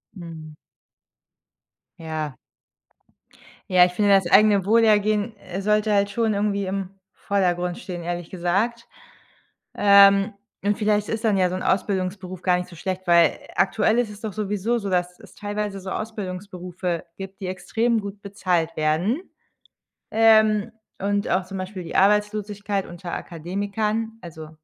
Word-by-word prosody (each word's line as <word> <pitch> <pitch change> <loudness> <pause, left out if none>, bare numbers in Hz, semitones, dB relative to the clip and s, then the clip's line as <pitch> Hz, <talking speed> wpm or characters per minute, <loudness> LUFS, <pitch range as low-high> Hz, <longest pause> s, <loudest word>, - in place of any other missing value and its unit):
Mhm. 160 -3 -9 1.4
Ja. 155 -4 -5 1.3
Ja, 180 -1 +6
ich 180 - +3
finde, 205 +2 +2
das 190 -3 +4
eigene 205 -2 +5
Wohlergehen, 215 0 +3
äh, 185 +2 -6
sollte 210 +1 +2
halt 200 0 +2
schon 225 -1 0
irgendwie 200 -1 0
im 190 0 -3 0.2
Vordergrund 180 -3 -1
stehen, 180 -7 -7
ehrlich 175 0 -4
gesagt. 195 +7 -1 0.9
Ähm, 200 0 +6 0.3
und 205 0 +1
vielleicht 210 -1 +1
ist 225 +1 -2
dann 205 -3 +3
ja 180 -1 +3
so 185 - -3
'n 185 - -4
Ausbildungsberuf 185 -1 -1
gar 180 -1 +2
nicht 180 - -5
so 170 - -12
schlecht 185 +2 -4
weil 170 -2 +5 0.2
aktuell 210 +4 +2
ist 235 -3 0
es 210 0 -11
doch 215 -4 -5
sowieso 210 +2 -1
so, 200 -2 -4
dass 180 -1 -1
es - - -16
teilweise 205 -1 -4
so 190 0 -6
Ausbildungsberufe 185 -4 -5
gibt, 195 +1 -9
die 185 - -3
extrem 220 +6 0
gut 200 0 -8
bezahlt 180 -5 -1
werden. 165 - +1 0.9
Ähm, 220 -1 +4 0.3
und 200 +1 0
auch 185 -1 +1
zum 195 0 -7
Beispiel 185 0 -6
die - - -4
Arbeitslosigkeit 205 0 +1
unter 175 0 -8
Akademikern 205 +6 -3
also 160 -2 -9
195 Hz, 145 wpm, -23 LUFS, 180-210 Hz, 1.4 s, Ja